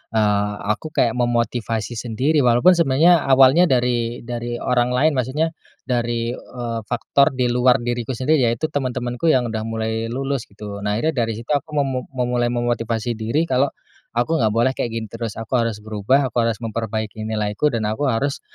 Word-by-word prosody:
eee, 105 -1 +2 0.2
aku 155 - -8
kayak 120 -6 +1
memotivasi 120 -2 -1
sendiri, 125 +7 0
walaupun 125 +9 +5
sebenarnya 165 +1 +4
awalnya 135 +6 +6
dari 120 -2 0
dari 120 0 -4
orang 125 0 +1
lain, 155 +5 +3
maksudnya 135 +5 0 0.3
dari, 120 -2 -1
eee, 120 -3 -5
faktor 130 +2 +2
di 125 -1 +1
luar 125 +1 +4
diriku 120 +1 -2
sendiri, 140 +4 +2
yaitu 120 +7 -1
teman-temanku 125 +1 -2
yang 125 -6 +2
udah 110 -1 -2
mulai 110 0 -2
lulus 135 +1 -3
gitu. 100 0 -8
Nah, 105 0 -1
akhirnya 125 -2 0
dari 115 - -3
situ 115 +5 -7
aku 150 +1 -1
memu-memulai 125 -2 -1
memotivasi 120 -1 -1
diri 115 +8 -1
kalau 135 -2 +2 0.5
aku 120 +8 +1
nggak 110 -3 +3
boleh 120 +3 +3
kayak 120 - -3
gini 115 - -3
terus. 115 -2 -5
Aku 115 -1 -7
harus 115 -2 -1
berubah, 110 +6 +1
aku 120 - 0
harus 115 -2 0
memperbaiki 110 -1 -4
nilaiku, 105 +5 0
dan 115 -4 -2
aku 110 +7 -1
harus 135 +5 -1
120 Hz, 170 wpm, -21 LUFS, 115-130 Hz, 0.5 s, awalnya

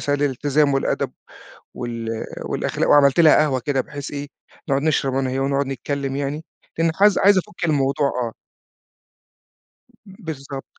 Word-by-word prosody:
مثال 145 0 -1
الالتزام 145 +1 +1
والأدب 135 - -1 0.6
وال 115 -2 -4 0.2
والأخلاق، - - -2
وعملت 145 +2 +5
لها 160 -2 +7
قهوة 145 -4 +2
كده 135 +1 0
بحيث 140 +2 -7
إيه 145 0 -5 0.4
نقعد 140 0 +1
نشرب 140 -4 +1
أنا 135 -1 0
وهي 130 - -2
ونقعد 140 +1 0
نتكلّم 135 +1 -3
يعني، 145 +3 -3 0.3
لأن 165 0 +2
حز 205 +3 +4
عايِز 200 -1 +5
أفُكّ 175 -1 -5
الموضوع 140 -2 +1
آه. 120 -4 -3 1.7
بالضبط. 150 -9 -8
140 Hz, 140 wpm, -21 LUFS, 135-150 Hz, 1.7 s, لها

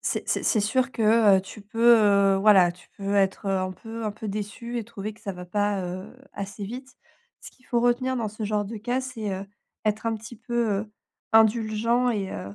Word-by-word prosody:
c'est - - -1
c'est - - 0
c'est 220 - +2
sûr 255 +5 +1
que, 220 -2 +5
heu, - - -1
tu 195 +3 -11
peux, 230 +3 +4 0.4
heu, - - +1
voilà, 195 -3 +6
tu 180 - -20
peux 200 0 -2
être 195 0 +1
un 185 -1 0
peu 225 +3 -8
un 215 - -1
peu 210 +1 -7
déçue 215 +4 -4
et 225 - -4
trouver 215 -2 -6
que 215 - -22
ça 200 - -4
va 180 -1 -8
pas, 205 +2 0
heu, 185 +4 -6 0.2
assez 200 +1 -6
vite. 255 +6 -8 0.4
Ce - - -10
qu'il 255 - -27
faut 240 - +1
retenir 250 +2 +1
dans 225 -3 -1
ce 215 +2 -8
genre 210 0 0
de 220 +3 -6
cas, 245 +4 -1
c'est, 235 -5 -5
heu, 190 +1 -5 0.4
être 215 +2 -1
un 225 - +1
petit 225 +2 -9
peu, 235 0 -1
heu, 210 0 -9 0.4
indulgent 225 +2 +3
et, 200 -4 -2
heu, 100 +2 -7
215 Hz, 220 wpm, -25 LUFS, 200-235 Hz, 0.4 s, voilà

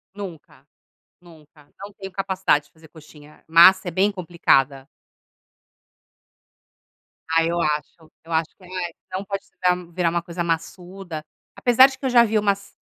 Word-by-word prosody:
Nunca. 185 -7 -10 0.6
Nunca. 155 -3 -19
Não 200 +1 -10
tenho 195 -1 -9
capacidade 190 -6 0
de - - -27
fazer 160 0 -19
coxinha. 150 -1 -17
Massa 180 +3 +6
é - - -2
bem 195 +5 +2
complicada. 145 -7 +1 2.4
Ah 165 0 +3
eu 170 +1 -1
acho. 155 +1 -3
Eu 165 - -10
acho 160 0 0
que 185 - -18
não 185 +1 -7
é. 175 - -3 0.2
Não 190 +2 -4
pode 195 0 -5 0.2
virar 180 -1 0
virar 170 -1 0
uma 170 0 -1
coisa 175 0 -5
massuda. 175 0 -5 0.3
Apesar 250 +2 +6
de 270 - -10
que, - - -12
eu - - 0
já 240 -1 +6
vi 215 -1 +1
umas 200 -1 -1
175 Hz, 160 wpm, -22 LUFS, 160-195 Hz, 2.4 s, Massa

